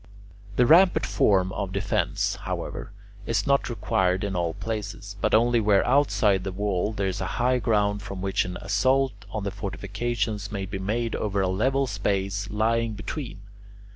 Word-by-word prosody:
The 125 - +4
rampart 175 +7 +5
form 95 -2 +2
of 100 -2 -3
defence, 100 +2 0
however, - - -5 0.4
is 115 - 0
not 140 -2 +2
required 95 -4 0
in 100 -2 -2
all 85 -1 -1
places, 100 -1 -5
but - - +3
only 120 +1 +4
where 105 -3 +3
outside 115 -8 +3
the 95 - -3
wall 100 +1 -1
there 100 -2 -2
is 95 0 -2
high 125 +1 0
ground 105 -3 +1
from 95 -2 -7
which 95 +1 0
an 90 -1 -5
assault 130 +7 +2 0.2
on 105 0 -4
the 100 - -2
fortifications 105 +1 -3
may 100 -2 -3
be 95 0 -5
made 115 +4 -1
over 100 -2 -1
a 95 - +1
level 130 +9 +1
space 100 -2 -2
lying 115 +2 +1
between. 105 +1 -6
105 Hz, 165 wpm, -26 LUFS, 95-115 Hz, 0.4 s, rampart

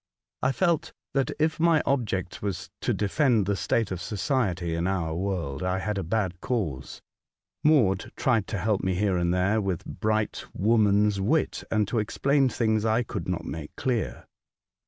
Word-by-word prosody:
I 130 - +2
felt 170 +1 0 0.2
that 135 -1 +1
if 155 +1 +1
my 165 -2 +4
object 105 -9 -1
was 95 -3 -4
to - - 0
defend 110 0 +2
the 100 +1 0
state 110 +1 0
of 90 -2 -3
society 95 - -1
in 85 +2 -1
our 85 -4 -1
world, 85 -6 -2
I 90 0 0
had 105 +1 -2
a - - -2
bad 90 -1 -1
cause. 90 - -3 0.6
Maud 120 - +3
tried 115 -6 +1
to 105 - -3
help 105 +1 0
me 95 -1 +1
here 100 0 +1
and 85 0 +1
there 95 +4 +2
with 95 -4 -2
bright 110 +3 -1
woman's 105 -1 +3
wit, 150 +11 +1
and 110 -2 +1
to 115 +2 0
explain 135 +5 +2
things 110 -3 +1
I 110 +2 +2
conld - - -5
not - - -2
make 80 -2 -6
clear. 125 -4 -2
105 Hz, 170 wpm, -27 LUFS, 95-120 Hz, 0.6 s, my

